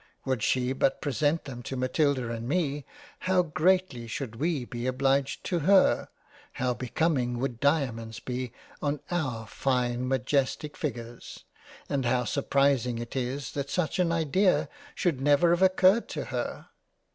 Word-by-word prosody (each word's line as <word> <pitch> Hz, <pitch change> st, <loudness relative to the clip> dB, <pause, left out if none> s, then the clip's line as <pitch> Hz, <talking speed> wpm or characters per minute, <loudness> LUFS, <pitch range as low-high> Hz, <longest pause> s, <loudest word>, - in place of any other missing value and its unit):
Would 130 Hz, -4 st, 0 dB
she 125 Hz, +3 st, +1 dB
but 135 Hz, 0 st, +1 dB
present 145 Hz, +3 st, 0 dB
them 125 Hz, -4 st, -7 dB
to 135 Hz, -, -5 dB
Matilda 130 Hz, -1 st, +1 dB
and 115 Hz, +1 st, -4 dB
me, 145 Hz, -4 st, 0 dB, 0.4 s
how 185 Hz, -1 st, +4 dB
greatly 165 Hz, -6 st, +1 dB
should 115 Hz, 0 st, -5 dB
we 155 Hz, -2 st, -1 dB
be 120 Hz, +1 st, -4 dB
obliged 135 Hz, +1 st, +1 dB
to 175 Hz, -3 st, -1 dB
her, 190 Hz, +5 st, +4 dB, 0.5 s
How 125 Hz, 0 st, 0 dB
becoming 125 Hz, 0 st, 0 dB
would 125 Hz, -2 st, -3 dB
Diamonds 120 Hz, -7 st, 0 dB
be 125 Hz, -1 st, -4 dB, 0.3 s
on 145 Hz, 0 st, -1 dB
our 130 Hz, -10 st, -2 dB
fine 125 Hz, +1 st, -1 dB
majestic 135 Hz, +3 st, 0 dB
figures! 120 Hz, -5 st, -6 dB, 0.4 s
And 140 Hz, -2 st, -1 dB
how 125 Hz, +1 st, +2 dB
surprising 135 Hz, -2 st, +1 dB
it 120 Hz, +2 st, -6 dB
is 130 Hz, +2 st, -2 dB
that 140 Hz, -1 st, -4 dB
such 180 Hz, +3 st, -1 dB
an 175 Hz, -2 st, +2 dB
Idea 165 Hz, +4 st, +2 dB, 0.3 s
should 160 Hz, -, 0 dB
never 145 Hz, +4 st, +4 dB
have 175 Hz, +1 st, +2 dB
occurred 190 Hz, +3 st, +4 dB
to -, -, -4 dB
her. -, -, -4 dB
135 Hz, 145 wpm, -28 LUFS, 125-155 Hz, 0.5 s, how